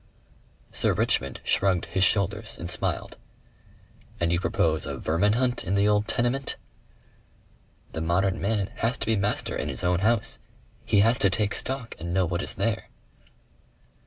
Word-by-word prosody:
Sir - - +1
Richmond 70 0 0
shrugged 95 -3 +1
his 90 +3 0
shoulders 100 -1 +1
and 85 0 -5
smiled. - - -2 1.0
"And 85 0 +1
you 85 - +2
propose 80 -4 +1
a - - -4
vermin 85 +7 +1
hunt 125 +1 0
in 95 +1 -1
the 100 +1 +3
old 105 0 +2
tenement?" 120 +3 0 1.4
"The 80 - -3
modern 90 +3 +1
man 100 -1 0
has 115 +4 0
to - - -3
be 110 - +2
master 100 +1 -1
in - - -3
his - - 0
own 90 -1 +2
house. 115 +2 +1 0.5
He 105 -3 +4
has 115 +3 +3
to 100 - +4
take 100 +2 0
stock 130 -3 -1
and 85 +2 -4
know 95 -1 +3
what 85 +2 -2
is - - -1
there." 115 -3 -1
100 Hz, 160 wpm, -26 LUFS, 85-115 Hz, 1.4 s, He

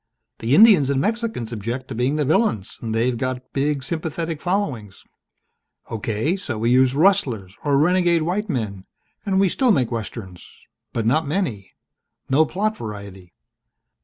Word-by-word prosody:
The 115 +5 +2
Indians 195 - +7
and 140 -1 +1
Mexicans 220 - -2
object 120 +4 -4
to - - -4
being 125 +5 0
the 150 -1 0
villains 135 - 0
and 115 -1 -3
they've 120 +2 +1
got 130 +1 -4
big 140 0 0
sympathetic 160 0 -3
followings. 145 - -2 0.9
Okay, 110 - -1
so 145 - -5
we 115 +2 +1
use 130 +1 +4
rustlers 135 - +2
or 145 -2 +2
renegade 175 +1 +3
white 195 +6 -2
men 105 - -3 0.4
and 190 -1 +2
we 195 - +4
still 255 +8 +1
make 125 - +1
Westerns 110 -5 -6 0.4
but 115 - -2
not 150 +6 +2
many. 145 - -3 0.6
No 155 +4 +4
plot 215 +3 -1
variety." 100 -4 -9
135 Hz, 150 wpm, -22 LUFS, 115-175 Hz, 0.9 s, Indians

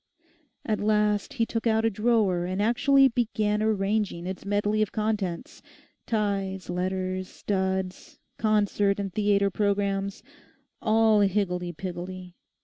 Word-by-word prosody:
At 215 -1 0
last 210 +3 +1
he 230 -4 +1
took 225 0 -2
out 220 0 +2
a 225 - +2
drawer 210 -5 +1
and 185 +2 -3
actually 270 +5 +4
began 215 -3 0
arranging 205 -4 0
its 190 +1 -6
medley 205 +1 +1
of 215 - 0
contents; 210 -5 -3 0.5
ties, 195 -4 -1
letters, 185 +1 -2
studs, 190 -1 -3 0.2
concert 205 -2 +2
and 195 -2 -4
theatre 200 -1 +2
programmes—all 205 +2 -1
higgledy 185 -3 0
piggledy. 180 +1 -7
205 Hz, 115 wpm, -26 LUFS, 190-215 Hz, 0.5 s, actually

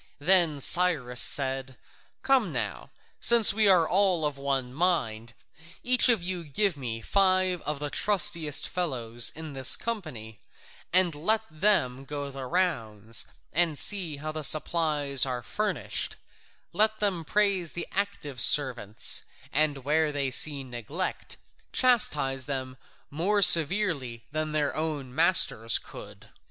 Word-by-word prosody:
Then 165 -2 +2
Cyrus 140 -7 +2
said: 135 -2 -1 0.5
"Come 260 -9 +1
now, 125 - -4 0.3
since 235 -4 +6
we 215 0 +1
are 180 -4 +3
all 185 -4 0
of 150 -1 -3
one 135 -2 -3
mind, 120 -9 -2 0.5
each 250 +1 +4
of 225 -7 +1
you 180 -1 -5
give 175 +5 -2
me 120 -5 -6
five 185 - 0
of 150 -1 -3
the 145 0 -6
trustiest 170 -7 +2
fellows 120 -9 +1
in 160 -1 -8
his 130 -1 +4
company, 130 - -7 0.5
and 180 -2 +3
let 215 +9 -1
them 155 -7 0
go 140 0 -7
the 135 -1 -8
rounds, 115 - -1 0.3
and 165 -2 0
see 180 -6 +2
how 155 +2 -6
the 155 0 -7
supplies 150 -3 +1
are 125 -2 -5
furnished; 210 - -2 0.6
let 215 +1 +1
them 195 -5 -2
praise 195 -2 -1
the 175 - -6
active 175 - -4
servants, 125 -8 +2 0.3
and 145 -3 0
where 155 +1 0
they 140 -2 -3
see 140 +1 +2
neglect, 130 - -7 0.3
chastise 145 - +1
them 130 -2 -5 0.4
more 195 +7 0
severely 160 - +3
than 155 +1 -4
their 150 -2 -2
own 150 -5 -4
masters 150 - +3
could." - - -12
155 Hz, 130 wpm, -26 LUFS, 135-185 Hz, 0.6 s, since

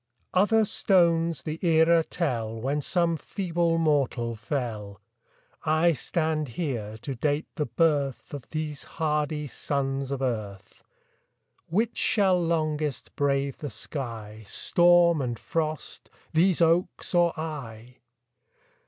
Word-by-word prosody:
Other 215 +4 +4
stones 170 -7 +2
the 155 +3 -5
era 165 0 +4
tell 115 -11 -2
When 140 +5 -1
some 170 +2 +1
feeble 170 -1 -1
mortal 135 -7 +1
fell; 110 -4 -4 0.6
I 160 +2 +3
stand 155 +2 -1
here 115 -10 -3
to 140 - -3
date 145 +5 -1
the 150 -3 -2
birth 140 +1 0
Of 140 -3 -8
these 155 -2 -4
hardy 150 -1 0
sons 135 -1 -2
of 135 -1 -3
earth. 105 -6 -4 0.8
Which 215 +7 0
shall 190 -4 +3
longest 155 -3 -1
brave 140 -1 0
the 145 - -5
sky, 110 -3 -5
Storm 175 - +4
and 120 -3 -2
frost 155 +2 -4 0.2
these 175 +2 +3
oaks 165 +3 +1
or 175 -1 +4
I? 125 -6 -7
150 Hz, 115 wpm, -26 LUFS, 130-165 Hz, 0.8 s, Other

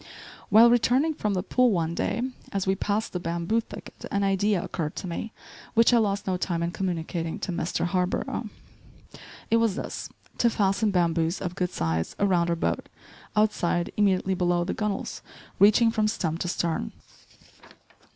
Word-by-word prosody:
While 225 +3 +7
returning 255 +6 +3
from 210 -9 -1
the 180 - -1
pool 250 +4 +3
one 170 -5 0
day, 225 +6 -1 0.3
as 195 -1 -1
we 190 - +2
passed 205 +3 -2
the 180 - -2
bamboo 170 +6 -1
thicket - - -11
an 200 0 0
idea 195 0 +2
occurred 155 -2 -4
to - - -5
me 180 +6 -4 0.4
which 230 +2 +5
I 235 - +6
lost 200 -2 0
no 185 -1 0
time 170 -2 -2
in 170 - -1
communicating 170 -1 -3
to 200 -3 -4
Mr. 170 0 -1
Harborough. 180 +1 -1 1.0
It 230 - +5
was 230 -4 +2
this; - - -5 0.3
to 235 - +4
fasten 205 0 +1
bamboos, 170 -2 +1
of 180 -2 -4
good 180 -1 -1
size, 80 - -2
around 180 -4 +2
our 170 - +2
boat, 165 - -2 0.5
outside, 180 -5 +1
immediately 190 -2 +2
below 175 -1 +1
the 175 - -2
gunwales, 210 -2 -3 0.4
reaching 215 +3 +6
from 215 -2 +1
stem 165 -6 -2
to 180 - -2
stern. 170 - -2
190 Hz, 165 wpm, -26 LUFS, 170-215 Hz, 1.0 s, While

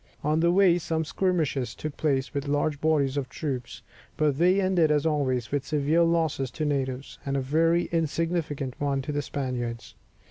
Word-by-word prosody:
On 155 +2 +2
the 170 +1 +3
way 180 -2 +5
some 160 -1 -2
skirmishes 155 - -1
took 155 -2 -5
place 140 -3 0
with 140 0 -3
large 145 0 0
bodies 145 -3 +2
of 135 -2 -2
troops, 125 -6 -5 0.3
but 150 -2 +1
they 180 +3 +4
ended 185 -4 +3
as 150 0 +2
always, 130 -7 0
with 145 -1 0
severe 150 +3 +1
loss 165 -2 +2
to 135 -2 -2
the 155 - -3
natives, 135 -2 -2
and 140 0 -1
a - - +1
very 165 +6 +2
insignificant 160 -4 -1
one 140 -2 0
to 150 - -4
the 145 0 -1
Spaniards. 125 -5 -4
150 Hz, 180 wpm, -26 LUFS, 135-165 Hz, 0.3 s, way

